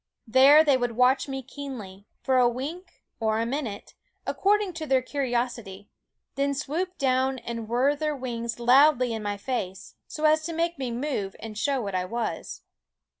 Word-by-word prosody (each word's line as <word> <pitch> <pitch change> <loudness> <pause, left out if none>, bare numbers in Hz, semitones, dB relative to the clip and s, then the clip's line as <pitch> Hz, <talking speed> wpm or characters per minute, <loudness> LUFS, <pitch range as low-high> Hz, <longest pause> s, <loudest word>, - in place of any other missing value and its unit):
There 270 +6 +7
they 285 -4 +4
would 245 -2 -2
watch 255 +4 +3
me 270 -1 -5
keenly, 230 -8 -9 0.2
for 260 -1 +3
a 245 -1 +5
wink 295 +10 -7 0.2
or 220 -1 +1
a 230 - 0
minute, 235 -5 -4 0.3
according 405 -1 +1
to 320 -1 -6
their 265 -2 +2
curi 275 0 -2
osity, 235 -5 -3 0.4
then 280 0 0
swoop 335 +7 -3
down 260 0 +1
and 230 -2 -6
whirr 260 +5 +2
their 305 0 -2
wings 235 -3 -4
loudly 255 0 +5
in 220 - -4
my 205 -1 -3
face, 200 -5 -4
so 305 - -7
as 310 0 +5
to 335 - -3
make 335 -1 -1
me 260 -2 -2
move 235 -6 -3
and 220 -1 -8
show 275 +5 0
what 200 -2 -4
I 180 0 0
was. 230 +5 -4
255 Hz, 175 wpm, -26 LUFS, 230-285 Hz, 0.4 s, There